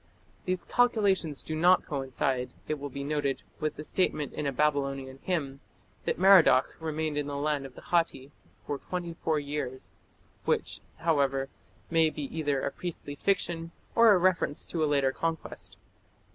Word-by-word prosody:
These 185 Hz, -1 st, -1 dB
calculations 200 Hz, -, +2 dB
do 155 Hz, -, -4 dB
not 175 Hz, +4 st, +4 dB
coincide, 135 Hz, -3 st, -2 dB
it 155 Hz, -1 st, -2 dB
will 145 Hz, 0 st, -5 dB
be 140 Hz, +1 st, -5 dB
noted, 145 Hz, -2 st, -1 dB, 0.2 s
with 155 Hz, -, -1 dB
the 150 Hz, -, -7 dB
statement 150 Hz, -4 st, 0 dB
in 150 Hz, -, -2 dB
a -, -, +1 dB
Babylonian 135 Hz, -2 st, 0 dB
hymn, 140 Hz, -7 st, -2 dB, 0.5 s
that -, -, 0 dB
Merodach 185 Hz, -8 st, +6 dB
remained 155 Hz, -1 st, -2 dB
in 145 Hz, -, -2 dB
the 145 Hz, -, -4 dB
land 145 Hz, -1 st, -1 dB
of 130 Hz, -, -18 dB
the -, -, -12 dB
Hatti 165 Hz, -5 st, 0 dB, 0.3 s
for 145 Hz, -, -3 dB
twenty 175 Hz, -2 st, -4 dB
four 160 Hz, -1 st, -1 dB
years, 140 Hz, -3 st, -5 dB, 0.5 s
which, -, -, 0 dB, 0.2 s
however, 140 Hz, -4 st, +1 dB, 0.4 s
may 165 Hz, -1 st, +5 dB
be 150 Hz, -1 st, -6 dB
either 145 Hz, -4 st, 0 dB
a -, -, -1 dB
priestly 165 Hz, -4 st, -6 dB
fiction 165 Hz, 0 st, 0 dB, 0.2 s
or 230 Hz, -1 st, +7 dB
a 200 Hz, -, +6 dB
reference 180 Hz, -5 st, +1 dB
to 165 Hz, -2 st, -2 dB
a 150 Hz, -, +2 dB
later 140 Hz, -2 st, +3 dB
conquest. 165 Hz, +2 st, -4 dB
150 Hz, 160 wpm, -29 LUFS, 140-170 Hz, 0.5 s, or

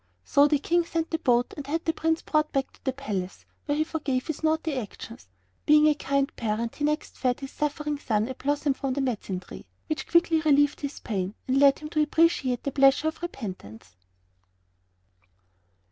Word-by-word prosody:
So 285 Hz, -, +4 dB
the 295 Hz, 0 st, +3 dB
King 345 Hz, +4 st, +1 dB
sent 330 Hz, -1 st, -3 dB
the 325 Hz, -, 0 dB
boat 245 Hz, -4 st, +2 dB
and 290 Hz, -3 st, -7 dB
had 325 Hz, +3 st, -2 dB
the 325 Hz, -, +1 dB
Prince 320 Hz, 0 st, 0 dB
brought 305 Hz, -1 st, +1 dB
back 270 Hz, -1 st, -1 dB
to -, -, -24 dB
the 265 Hz, -, 0 dB
palace, 205 Hz, -9 st, -5 dB, 0.2 s
where 290 Hz, 0 st, 0 dB
he 310 Hz, -, +3 dB
forgave 280 Hz, -5 st, -2 dB
his 315 Hz, -, -4 dB
naughty 315 Hz, 0 st, 0 dB
actions. 230 Hz, -, -7 dB, 0.4 s
Being 300 Hz, 0 st, +6 dB
a 305 Hz, -, +5 dB
kind 280 Hz, -1 st, -1 dB
parent 230 Hz, 0 st, -2 dB
he 295 Hz, -, -4 dB
next 300 Hz, +1 st, -1 dB
fed 250 Hz, -1 st, 0 dB
his 270 Hz, -1 st, -7 dB
suffering 295 Hz, 0 st, -2 dB
son 220 Hz, -5 st, 0 dB
a 260 Hz, -, -4 dB
blossom 285 Hz, +2 st, 0 dB
from 265 Hz, -1 st, -3 dB
a -, -, +2 dB
medicine 210 Hz, -8 st, -2 dB
tree, -, -, -12 dB, 0.2 s
which 310 Hz, -1 st, -4 dB
quickly 340 Hz, -2 st, +3 dB
relieved 290 Hz, -1 st, +3 dB
his 285 Hz, -1 st, -5 dB
pain 195 Hz, -2 st, -3 dB
and 265 Hz, +1 st, +2 dB
led 280 Hz, -1 st, +6 dB
him 300 Hz, -, -8 dB
to 305 Hz, -, +1 dB
appreciate 300 Hz, -5 st, +2 dB
the 280 Hz, -, -2 dB
pleasure 275 Hz, +3 st, +4 dB
of 315 Hz, -, -11 dB
repentance. 185 Hz, -, -8 dB
280 Hz, 190 wpm, -26 LUFS, 255-310 Hz, 0.4 s, Being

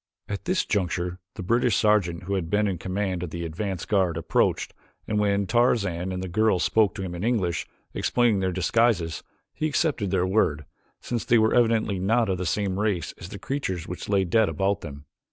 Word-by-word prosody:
At 100 Hz, -, -5 dB
this 185 Hz, 0 st, +1 dB
juncture 90 Hz, -3 st, -1 dB, 0.2 s
the 100 Hz, -, -6 dB
British 120 Hz, +5 st, +2 dB
sergeant 95 Hz, -6 st, +2 dB
who 100 Hz, +2 st, -3 dB
had 90 Hz, -4 st, -2 dB
been 105 Hz, +2 st, +2 dB
in 95 Hz, -4 st, -2 dB
command 95 Hz, -1 st, -2 dB
of 90 Hz, -, -4 dB
the 85 Hz, +1 st, -5 dB
advance 90 Hz, +2 st, -4 dB
guard 95 Hz, -5 st, +1 dB
approached 80 Hz, -, 0 dB, 0.3 s
and 105 Hz, -, 0 dB
when 100 Hz, -1 st, +1 dB
Tarzan 100 Hz, -6 st, +1 dB
and 90 Hz, 0 st, -4 dB
the -, -, -4 dB
girl 110 Hz, +2 st, +2 dB
spoke 105 Hz, +1 st, +2 dB
to 100 Hz, -, -4 dB
him 90 Hz, -2 st, -5 dB
in 85 Hz, +2 st, -5 dB
English, 105 Hz, -8 st, 0 dB, 0.3 s
explaining 120 Hz, -5 st, +2 dB
their 95 Hz, -1 st, 0 dB
disguises, 95 Hz, -2 st, +1 dB, 0.3 s
he 155 Hz, -, -1 dB
accepted 145 Hz, -, 0 dB
their 90 Hz, -1 st, +1 dB
word, 85 Hz, -7 st, +1 dB, 0.4 s
since 120 Hz, -2 st, -3 dB
they 120 Hz, -, +4 dB
were 110 Hz, 0 st, +3 dB
evidently 115 Hz, -5 st, +2 dB
not 110 Hz, +4 st, +2 dB
of 95 Hz, -2 st, -1 dB
the 90 Hz, -, -2 dB
same 95 Hz, +2 st, -1 dB
race 105 Hz, -6 st, -1 dB
as 85 Hz, -, -8 dB
the 100 Hz, -, -7 dB
creatures 95 Hz, -, -3 dB
which 90 Hz, -, -6 dB
lay 100 Hz, -2 st, +3 dB
dead 110 Hz, +4 st, +3 dB
about 100 Hz, +1 st, 0 dB
them. 75 Hz, -2 st, -9 dB
100 Hz, 200 wpm, -25 LUFS, 90-110 Hz, 0.4 s, they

